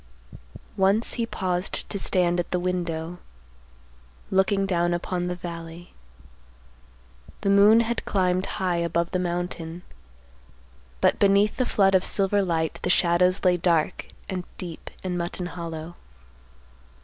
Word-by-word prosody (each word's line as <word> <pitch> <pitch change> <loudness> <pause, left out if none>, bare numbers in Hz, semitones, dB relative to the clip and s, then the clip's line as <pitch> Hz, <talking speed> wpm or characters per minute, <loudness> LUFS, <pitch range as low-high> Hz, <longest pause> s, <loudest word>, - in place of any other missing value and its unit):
Once 195 +4 +3
he 230 -1 -2
paused 185 -3 -2
to 200 - -3
stand 175 -2 +2
at 175 - -2
the 180 - 0
window, 175 -1 -3 1.1
looking 195 +1 +2
down 175 -2 +1
upon 175 +1 -3
the 180 - -2
valley. 170 -1 -8 1.5
The 200 - +1
moon 205 +3 +7
had 235 +1 -2
climbed 185 -1 0
high 180 -2 0
above 170 0 -1
the 185 - 0
mountain, 175 -1 -4 1.2
but - - +3
beneath 200 +1 +3
the 255 - 0
flood 195 -1 +3
of 190 -1 +4
silver 200 0 +2
light 165 -4 -1
the - - -2
shadows 180 +1 +3
lay 180 -1 +4
dark 170 -3 0 0.2
and 185 -1 -3
deep 170 -3 -7
in 180 -1 -2
Mutton 175 +1 -3
Hollow. 170 -2 -6
180 Hz, 130 wpm, -25 LUFS, 170-195 Hz, 1.5 s, moon